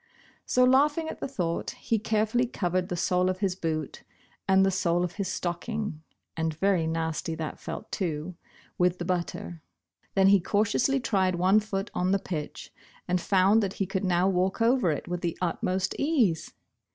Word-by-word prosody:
So 250 - +3
laughing 295 +5 +3
at - - -7
the - - -3
thought, 175 -11 -2
he 225 - 0
carefully 220 +3 +1
covered 180 -5 -1
the 180 - -2
sole 180 +2 +2
of 185 - -1
his 190 -2 -1
boot 155 -5 -3 0.5
and 190 0 +5
the 195 - +2
sole 175 -2 +1
of 180 - -2
his 200 -2 -1
stocking 185 0 -3 0.3
(and 160 -1 -1
very 185 -3 +2
nasty 160 0 -2
that 160 -1 -5
felt, - - -7
too) 165 -1 -3 0.5
with 180 0 +3
the 175 - -4
butter. 175 -2 -3 0.5
Then 195 0 +5
he 200 0 +6
cautiously 215 +8 +1
tried 190 -7 +1
one 185 +4 +4
foot 205 -1 -4
on 180 +1 0
the - - +4
pitch, 160 -6 -6 0.3
and 180 0 +1
found 195 +4 +4
that 195 -2 -2
he 195 - -1
could 190 +1 -3
now 180 0 +2
walk 190 +1 +1
over 235 -4 +3
it 150 - -2
with 175 0 -3
the 170 -1 -2
utmost 185 +2 -1
ease 245 - +1
185 Hz, 175 wpm, -27 LUFS, 175-210 Hz, 0.5 s, he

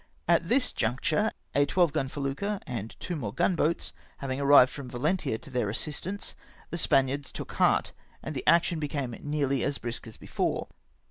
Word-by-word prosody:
At 170 0 +3
this 250 0 +3
juncture, 145 - +1 0.2
a 145 0 +3
twelve 175 -2 +3
gun 145 -4 0
felucca, 145 +9 -2
and 115 -6 -5
two 180 - -3
more 115 -10 -3
gun 180 - +2
boats 165 +1 0 0.2
having 135 -1 -3
arrived 140 -2 +7
from 140 -3 -7
Valentia 145 +1 0
to 140 - -13
theu" 125 -5 0
assistance, 155 - -4 0.4
the 170 - -2
Spaniards 135 -1 +2
took - - -6
heart, - - +2 0.3
and 155 - -5
the 130 - -5
action 170 +1 +4
became 140 -4 -2
nearly 140 -3 0
as 140 -1 0
brisk 120 0 -5
as 110 - -9
before. - - -2
145 Hz, 175 wpm, -28 LUFS, 130-165 Hz, 0.4 s, arrived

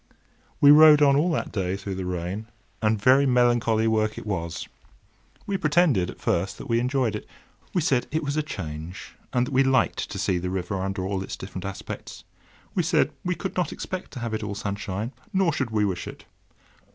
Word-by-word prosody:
We 145 - +8
rowed 150 0 +8
on 140 -1 +5
all 155 +6 +3
that - - -2
day 95 -2 -1
through 100 0 -5
the 95 0 -4
rain, 90 +4 -4 0.3
and 110 -1 +2
very 130 +6 +5
melancholy 120 -3 +3
work 110 -1 +1
it - - -7
was. 85 -5 -3 0.8
We 200 - -1
pretended, 150 - +3
at - - -9
first, - - -1
that - - -8
we 115 0 +2
enjoyed 125 -2 0
it. - - -7 0.4
We 180 - +1
said 130 -5 +1
it 155 +1 -1
was 140 0 -2
a 155 - +2
change, 85 - -7 0.2
and 125 0 +2
that 130 - -7
we 130 - +5
liked 135 -2 +1
to 100 - -6
see 95 -2 0
the 90 +1 -3
river 95 +1 -3
under 95 0 -2
all 95 0 -2
its 95 - -6
different 95 0 -7
aspects. 100 - -7 0.5
We - - +2
said - - +2
we 180 0 -1
could 190 +3 -5
not 180 -5 0
expect 185 -1 -5
to 130 - -6
have 115 -2 -3
it 110 - -2
all 105 -1 -4
sunshine, 100 +2 -4 0.2
nor 190 -4 +2
should 130 -4 -1
we 105 -2 +1
wish 95 -3 -3
it. - - -10
110 Hz, 205 wpm, -25 LUFS, 95-140 Hz, 0.8 s, We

